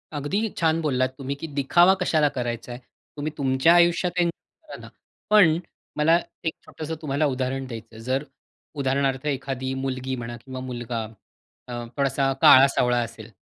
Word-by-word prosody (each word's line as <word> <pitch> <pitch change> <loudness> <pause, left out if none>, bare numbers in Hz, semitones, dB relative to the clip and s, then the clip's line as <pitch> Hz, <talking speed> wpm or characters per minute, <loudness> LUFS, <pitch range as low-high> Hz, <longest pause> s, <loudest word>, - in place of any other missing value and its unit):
अगदी 195 +10 -1
छान 165 0 +2
बोललात 130 -3 0
तुम्ही 140 0 -4
की 160 +3 -7
दिखावा 165 +6 +4
कशाला 155 -4 +3
करायचा 120 -1 -4
आहे, 120 - -7 0.4
तुम्ही 150 +1 -3
तुमच्या 135 +4 +3
आयुष्यात 175 +1 +3
एन्जॉय 175 - -4
करा - - -11
ना, - - -11 0.4
पण 180 -7 +6 0.4
मला 165 +3 +4 0.3
एक 160 - 0
छोटंसं 160 +1 -6
तुम्हाला 145 0 0
उदाहरण 130 0 -2
द्यायचं 115 -2 -9
आहे. 110 - -10
जर, 130 +3 -1 0.5
उदाहरणार्थ 135 0 0
एखादी 130 -1 -3
मुलगी 130 0 -3
म्हणा 120 -1 -6
किंवा 130 -1 -7
मुलगा 120 -2 -4 0.7
अ, - - -5 0.2
थोडासा, 135 0 +1
काळा-सावळा 130 -2 +6
असेल 115 -1 -10
135 Hz, 150 wpm, -24 LUFS, 130-155 Hz, 0.7 s, पण